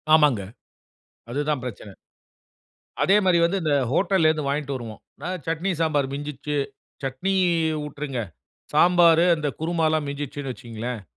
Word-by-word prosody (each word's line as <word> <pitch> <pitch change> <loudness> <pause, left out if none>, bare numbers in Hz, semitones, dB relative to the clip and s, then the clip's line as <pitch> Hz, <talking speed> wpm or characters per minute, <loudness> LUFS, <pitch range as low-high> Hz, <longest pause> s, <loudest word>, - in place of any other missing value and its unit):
ஆமாங்க. 150 -9 +4 0.9
அதுதான் 145 +1 -1
பிரச்சன. 105 -5 -7 1.1
அதே 195 - +5
மாரி 180 -2 +4
வந்து 190 +3 0
இந்த 150 -2 +1 0.2
ஹோட்டல்ல 185 +1 +3
இருந்து 155 -3 -1
வாங்கிட்டு 140 0 -1
வருவோம். 115 -4 -7 0.3
அ - - -2 0.2
சட்னி, 165 +4 -1
சாம்பார் 150 -4 +1
மிஞ்சிருச்சு, 145 0 -4 0.5
சட்னி 135 +9 -1 0.5
விட்டுருங்க, 145 -3 -5 0.6
சாம்பாரு 170 0 +6
அந்த 150 -1 -2
குருமாலாம் 160 -2 +1
மிஞ்சிச்சுன்னு 140 -1 -4
வச்சுக்கங்களேன், 120 -1 -6
150 Hz, 120 wpm, -24 LUFS, 135-165 Hz, 1.1 s, சாம்பாரு